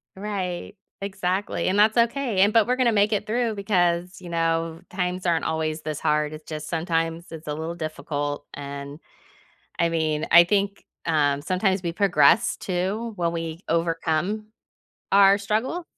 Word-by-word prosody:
Right. 190 Hz, -2 st, -4 dB, 0.3 s
Exactly, 195 Hz, 0 st, -2 dB
and 190 Hz, -, +1 dB
that's 215 Hz, +2 st, +4 dB
okay, 235 Hz, -2 st, +1 dB
and 205 Hz, +2 st, +5 dB
but 225 Hz, -2 st, +5 dB
we're 250 Hz, +1 st, 0 dB
gonna 245 Hz, -3 st, +3 dB
make 205 Hz, +1 st, +3 dB
it 210 Hz, 0 st, -1 dB
through 230 Hz, 0 st, 0 dB
because, 180 Hz, -3 st, 0 dB
you 175 Hz, -, -9 dB
know, 165 Hz, -1 st, 0 dB
times 180 Hz, 0 st, -3 dB
aren't 170 Hz, -2 st, +2 dB
always 160 Hz, 0 st, -2 dB
this 155 Hz, -1 st, -4 dB
hard, 150 Hz, 0 st, +1 dB
it's 155 Hz, 0 st, -10 dB
just 155 Hz, -1 st, -6 dB
sometimes 165 Hz, 0 st, -1 dB
it's 160 Hz, -1 st, -9 dB
a 150 Hz, -, -3 dB
little 160 Hz, +3 st, -4 dB
difficult, 145 Hz, -3 st, -4 dB
and, 140 Hz, +1 st, -7 dB, 0.8 s
I 170 Hz, -, +3 dB
mean, 160 Hz, -2 st, -1 dB
I 170 Hz, +1 st, +9 dB
think, 200 Hz, +2 st, 0 dB, 0.2 s
um, 145 Hz, -3 st, +2 dB
sometimes 190 Hz, +4 st, 0 dB
we 170 Hz, -2 st, -3 dB
progress 190 Hz, +2 st, +4 dB
too 195 Hz, +5 st, -2 dB
when 170 Hz, -3 st, 0 dB
we 165 Hz, 0 st, -5 dB
overcome, 170 Hz, +5 st, -1 dB, 0.6 s
our 200 Hz, 0 st, +6 dB
struggles. 220 Hz, -, -1 dB
175 Hz, 160 wpm, -24 LUFS, 160-200 Hz, 0.8 s, I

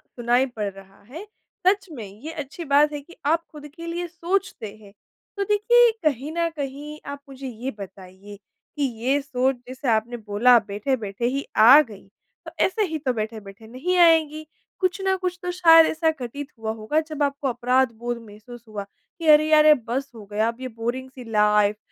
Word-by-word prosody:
सुनाई 245 Hz, +2 st, +2 dB
पड़ 205 Hz, -1 st, -1 dB
रहा 195 Hz, 0 st, -16 dB
है। 330 Hz, +10 st, -8 dB, 0.4 s
सच 395 Hz, 0 st, +3 dB
में 235 Hz, -8 st, -7 dB, 0.2 s
ये 320 Hz, -, -5 dB
अच्छी 310 Hz, +5 st, -9 dB
बात 290 Hz, +2 st, +4 dB
है 290 Hz, -, -5 dB
कि 345 Hz, +5 st, -17 dB
आप 330 Hz, +3 st, +2 dB
खुद 295 Hz, -1 st, -10 dB
के 335 Hz, 0 st, -8 dB
लिए 345 Hz, +1 st, -3 dB
सोचते 340 Hz, -, -3 dB
हैं। 200 Hz, -1 st, -16 dB, 0.4 s
तो 400 Hz, -, 0 dB
देखिए, 455 Hz, +4 st, +4 dB
कहीं 290 Hz, 0 st, 0 dB
ना 335 Hz, 0 st, 0 dB
कहीं 295 Hz, 0 st, -7 dB
आप 285 Hz, -, -7 dB
मुझे 270 Hz, 0 st, -8 dB
ये 250 Hz, +3 st, -5 dB
बताइए, 195 Hz, +1 st, -11 dB, 0.4 s
कि 290 Hz, -, 0 dB, 0.2 s
ये 275 Hz, +3 st, +2 dB
सोच 265 Hz, -1 st, 0 dB
जैसे 260 Hz, +1 st, -7 dB
आपने 225 Hz, +2 st, 0 dB
बोला 220 Hz, +3 st, +4 dB
बैठे-बैठे 210 Hz, +1 st, -3 dB
ही 275 Hz, +3 st, -1 dB
आ 250 Hz, +8 st, +9 dB
गई, 210 Hz, -7 st, -10 dB, 0.4 s
तो -, -, -8 dB
ऐसे 425 Hz, +3 st, 0 dB
ही 315 Hz, -, -1 dB
तो 260 Hz, -3 st, -1 dB
बैठे-बैठे 215 Hz, -1 st, -7 dB
नहीं 300 Hz, +10 st, -2 dB
आएगी, 315 Hz, -2 st, +4 dB, 0.3 s
कुछ 375 Hz, +1 st, 0 dB
ना 385 Hz, 0 st, +1 dB
कुछ 365 Hz, -1 st, -3 dB
तो 360 Hz, -, -2 dB
शायद 330 Hz, -2 st, +7 dB
ऐसा 320 Hz, 0 st, +1 dB
घटित 275 Hz, +4 st, -6 dB
हुआ 220 Hz, 0 st, -3 dB
होगा 295 Hz, +9 st, 0 dB
जब 310 Hz, -2 st, -4 dB
आपको 280 Hz, 0 st, -1 dB
अपराध 250 Hz, +1 st, +1 dB
बोध 240 Hz, 0 st, -2 dB
महसूस 230 Hz, +3 st, -13 dB
हुआ, 210 Hz, -2 st, -6 dB, 0.4 s
कि 325 Hz, -, -4 dB
अरे 305 Hz, 0 st, +6 dB
यार 305 Hz, 0 st, +6 dB
ये 305 Hz, -, +9 dB
बस 270 Hz, +3 st, -3 dB
हो 210 Hz, -2 st, -11 dB
गया 215 Hz, +2 st, +1 dB
अब 230 Hz, +1 st, -3 dB
ये 260 Hz, -, -4 dB
बोरिंग 240 Hz, +3 st, -4 dB
सी 255 Hz, -1 st, -11 dB
लाइफ़, 210 Hz, -1 st, +3 dB
270 Hz, 190 wpm, -23 LUFS, 225-315 Hz, 0.4 s, आ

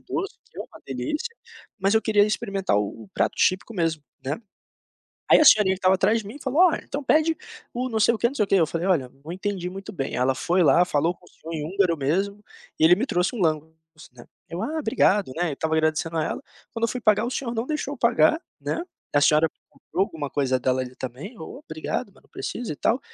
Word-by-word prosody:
doce, 390 Hz, +5 st, -3 dB, 0.2 s
uma -, -, -9 dB
delícia, 390 Hz, +10 st, -3 dB, 0.4 s
mas 195 Hz, +1 st, +2 dB
eu 220 Hz, -, +4 dB
queria 205 Hz, -1 st, +4 dB
experimentar 200 Hz, -, -1 dB
o 105 Hz, +2 st, -2 dB
o -, -, -18 dB
prato -, -, +1 dB
típico 190 Hz, +4 st, +1 dB
mesmo, 165 Hz, -4 st, 0 dB, 0.2 s
né. 145 Hz, +7 st, -3 dB, 0.9 s
Aí -, -, +8 dB
a -, -, +6 dB
senhorinha 210 Hz, -8 st, +7 dB
que -, -, -9 dB
estava 185 Hz, 0 st, +4 dB
atrás 200 Hz, +4 st, +3 dB
de 210 Hz, -, -11 dB
mim 225 Hz, +8 st, -8 dB
falou: 275 Hz, +5 st, 0 dB
"Olha, 350 Hz, -3 st, +4 dB
então 285 Hz, -, -4 dB
pede 315 Hz, +4 st, +3 dB, 0.4 s
o 250 Hz, +2 st, -2 dB
não 225 Hz, -3 st, -1 dB
sei 230 Hz, -, +5 dB
o 220 Hz, -, -4 dB
que -, -, +3 dB
não 255 Hz, -, -3 dB
sei 220 Hz, -, +2 dB
o -, -, -11 dB
que." -, -, +2 dB
Eu 165 Hz, -4 st, +4 dB
falei: 165 Hz, +3 st, -3 dB
"Olha, 150 Hz, -9 st, +2 dB, 0.2 s
não 160 Hz, -, -8 dB
entendi 190 Hz, -1 st, -3 dB
muito 195 Hz, +3 st, -8 dB
bem." 135 Hz, -7 st, -3 dB
Ela 130 Hz, +2 st, +2 dB
foi 175 Hz, +6 st, +1 dB
lá, 170 Hz, +3 st, +5 dB
falou 165 Hz, +1 st, +1 dB
com 180 Hz, -, -25 dB
o -, -, -17 dB
senhor 165 Hz, -, -10 dB
em 150 Hz, -, -3 dB
húngaro 180 Hz, 0 st, +1 dB
mesmo, 195 Hz, +9 st, -1 dB, 0.4 s
e -, -, +5 dB
ele 175 Hz, +2 st, +7 dB
me 235 Hz, +7 st, -1 dB
trouxe 180 Hz, +2 st, 0 dB
um -, -, -4 dB
langos, 160 Hz, -2 st, +1 dB, 0.4 s
né. 120 Hz, -1 st, -14 dB, 0.2 s
Eu: 170 Hz, +2 st, -5 dB
"Ah, 310 Hz, +7 st, -2 dB
obrigado." 205 Hz, -, +2 dB
Né, 175 Hz, -1 st, 0 dB
eu -, -, -3 dB
estava 160 Hz, +2 st, -1 dB
agradecendo 160 Hz, +1 st, 0 dB
a 155 Hz, -, +1 dB
ela, -, -, -4 dB, 0.3 s
quando 230 Hz, -, -6 dB
eu -, -, +2 dB
fui 250 Hz, +3 st, -3 dB
pagar 215 Hz, -1 st, +3 dB
o 245 Hz, -, -2 dB
senhor 240 Hz, -2 st, -3 dB
não 225 Hz, -, -1 dB
deixou 300 Hz, -2 st, -3 dB
eu 270 Hz, -, -15 dB
pagar, 245 Hz, +7 st, +4 dB, 0.2 s
né, 335 Hz, -, -2 dB, 0.3 s
a 145 Hz, -, +5 dB
senhora 155 Hz, +2 st, +5 dB, 0.2 s
comprou 190 Hz, -, -2 dB
alguma 150 Hz, -7 st, -6 dB
coisa 130 Hz, -2 st, +1 dB
dela 130 Hz, +1 st, +1 dB
ali 125 Hz, 0 st, -8 dB
também: 130 Hz, -, -7 dB
"Olha 270 Hz, -, -9 dB
obrigado, -, -, -4 dB
mas -, -, -22 dB
não -, -, -28 dB
precisa 240 Hz, -9 st, -4 dB
e -, -, -8 dB
tal." 235 Hz, -, +1 dB
190 Hz, 240 wpm, -24 LUFS, 160-230 Hz, 0.9 s, Aí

